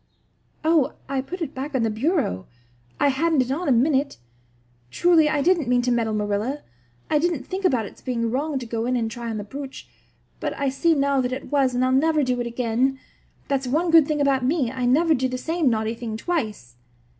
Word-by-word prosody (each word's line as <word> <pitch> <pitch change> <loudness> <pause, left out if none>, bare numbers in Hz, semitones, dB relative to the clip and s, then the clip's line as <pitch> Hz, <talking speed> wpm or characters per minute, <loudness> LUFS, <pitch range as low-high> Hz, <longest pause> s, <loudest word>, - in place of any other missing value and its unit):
"Oh, 320 -4 +3
I 270 0 -1
put 345 +6 -5
it 300 - -6
back 275 +2 -5
on 250 - +1
the 225 - +1
bureau. 220 - -1 0.5
I 285 - +4
hadn't 295 +1 +2
it 250 - -5
on 335 +6 -2
a - - +4
minute. 275 +3 +2 0.7
Truly, 330 - +4
I 295 -2 0
didn't 340 -4 +2
mean 245 0 +2
to 245 - +1
meddle, 225 -2 0
Marilla. 210 +7 -2 0.5
I 300 - +4
didn't 320 -5 -1
think 380 +4 -4
about 250 - +2
its - - -12
being 230 -3 -2
wrong 285 +3 -1
to 255 - -5
go 230 0 -3
in 255 - +1
and 225 -2 -2
try 235 0 -5
on 220 - -3
the 205 - -4
brooch; 270 +5 -8 0.5
but - - -3
I 280 -1 0
see 325 +5 +2
now 280 -1 +2
that 250 0 -2
it 260 +3 -6
was 270 -3 +2
and 250 +1 +2
I'll 255 - +1
never 305 +3 +3
do 250 -1 0
it 240 - -3
again. 245 +3 0 0.5
That's 270 -2 -1
one 325 +7 +1
good 325 -3 +7
thing 305 -1 -1
about 275 -2 +2
me. 265 -2 +1
I 255 -1 -2
never 320 +6 +4
do 260 -2 +1
the 255 - -3
same 320 +1 0
naughty 220 -1 0
thing 230 -2 -5
twice." 215 - -3
265 Hz, 220 wpm, -23 LUFS, 240-300 Hz, 0.7 s, good